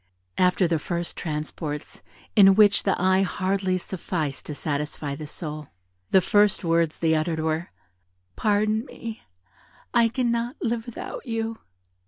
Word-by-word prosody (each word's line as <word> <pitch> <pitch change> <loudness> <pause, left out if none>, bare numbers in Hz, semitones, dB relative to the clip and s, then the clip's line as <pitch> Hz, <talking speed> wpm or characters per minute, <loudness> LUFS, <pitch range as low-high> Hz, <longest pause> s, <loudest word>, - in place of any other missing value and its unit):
After 180 0 +4
the 165 -1 +1
first 170 +2 -3
transports, 150 -1 -5 0.3
in 195 -2 +8
which 205 -1 +6
the 195 - 0
eye 185 +1 +3
hardly 190 0 0
sufficed 165 -6 -4
to 150 - -5
satisfy 145 -1 -3
the 150 +1 -7
soul, 150 -1 -5 0.4
the 190 - +5
first 205 +2 +3
words 165 -2 +1
they 160 -1 +2
uttered 160 +1 0
were, 160 +2 -1 0.7
"Pardon 215 +1 +1
me, 230 -5 -8 0.7
I 235 -1 +5
cannot 235 +1 -1
live 230 0 -2
without 240 +3 -7
you." 225 -1 -2
185 Hz, 135 wpm, -25 LUFS, 160-215 Hz, 0.7 s, in